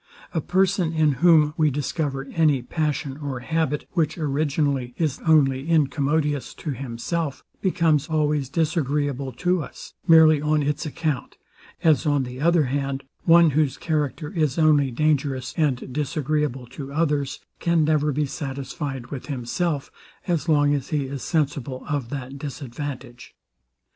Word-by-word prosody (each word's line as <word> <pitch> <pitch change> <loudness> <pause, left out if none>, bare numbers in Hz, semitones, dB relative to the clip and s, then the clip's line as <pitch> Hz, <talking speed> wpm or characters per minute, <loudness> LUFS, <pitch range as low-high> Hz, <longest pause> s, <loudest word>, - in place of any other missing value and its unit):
A 165 - 0
person, 185 -1 +1
in 155 -2 +3
whom 160 -4 +5
we 155 -2 +4
discover 145 0 -2
any 150 -6 +3
passion 150 -1 -2
or 140 -4 -5
habit, 160 0 -1
which 160 -3 0
originally 140 -4 0
is 155 -5 -1
only 140 -2 +3
incommodious 150 -2 +1
to 155 - -5
himself, 135 +4 -3 0.2
becomes 160 -6 +2
always 150 -4 0
disagreeable 145 -4 -1
to 180 +7 0
us, - - -10
merely 160 -2 +7
on 150 0 +1
its 150 +2 -1
account; 150 -3 -3 0.5
as 155 0 +3
on 145 -2 +2
the 125 +1 -7
other 170 0 +4
hand, 135 0 -2 0.2
one 170 -1 +6
whose 145 -1 +1
character 150 -1 -2
is 155 -8 0
only 150 -4 +4
dangerous 140 -1 0
and 135 -5 0
disagreeable 150 -2 -1
to 135 +3 -8
others, 145 -3 0 0.2
can 170 -2 +2
never 150 -1 +2
be 150 +2 0
satisfied 135 -2 -5
with 135 -3 -6
himself, 140 +3 -2 0.4
as 170 -2 0
long 145 -2 +4
as 140 -2 -2
he 145 -3 0
is 135 0 -6
sensible 140 -5 -2
of 145 -6 -2
that 135 0 -6
disadvantage. 135 -3 -7
145 Hz, 140 wpm, -24 LUFS, 135-155 Hz, 0.5 s, merely